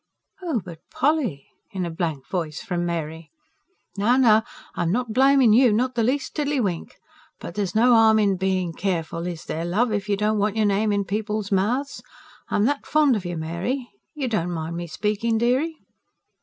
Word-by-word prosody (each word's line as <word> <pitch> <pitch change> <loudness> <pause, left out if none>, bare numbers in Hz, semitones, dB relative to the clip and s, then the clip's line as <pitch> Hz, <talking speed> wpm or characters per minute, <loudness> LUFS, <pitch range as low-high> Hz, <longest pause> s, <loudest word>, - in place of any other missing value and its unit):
("Oh, 325 -9 -1
but 165 -3 -9
Polly!" 260 - 0 0.2
in 185 -2 -3
a 170 - -4
blank 160 -5 -3
voice 165 -5 -3
from 175 -6 -2
Mary.) 160 -1 -4 0.7
"Now, 230 +6 +3
now, 220 -4 +5 0.3
I'm 170 -1 -1
not 240 +1 -1
blaming 265 -2 +5
you 245 0 +6
not 250 +4 +1
the 235 - 0
least 255 +4 -1
tiddly 290 -2 0
wink. 185 -8 -3 0.4
But - - -7
there's 200 0 -3
no 240 +3 +5
harm 220 -1 +6
in 205 -3 +2
being 185 -2 -1
careful, 170 -2 -2
is 170 -3 -6
there, 160 - -3
love, 210 +8 +1
if 205 0 -2
you 200 - +1
don't 210 +1 +1
want 205 +1 0
your 215 - +3
name 205 +1 +2
in 200 -1 0
people's 210 +1 -3
mouths? 240 +9 0 0.5
I'm 205 - +2
that 285 +3 -1
fond 300 -4 +3
of 200 -4 -4
you, 175 -1 -4
Mary 190 +10 -3 0.2
you 280 -4 -2
don't 210 -7 -1
mind 165 -1 -4
me 175 0 -5
speaking, 210 +5 -1
dearie?" 260 +8 +1
210 Hz, 185 wpm, -23 LUFS, 175-245 Hz, 0.7 s, you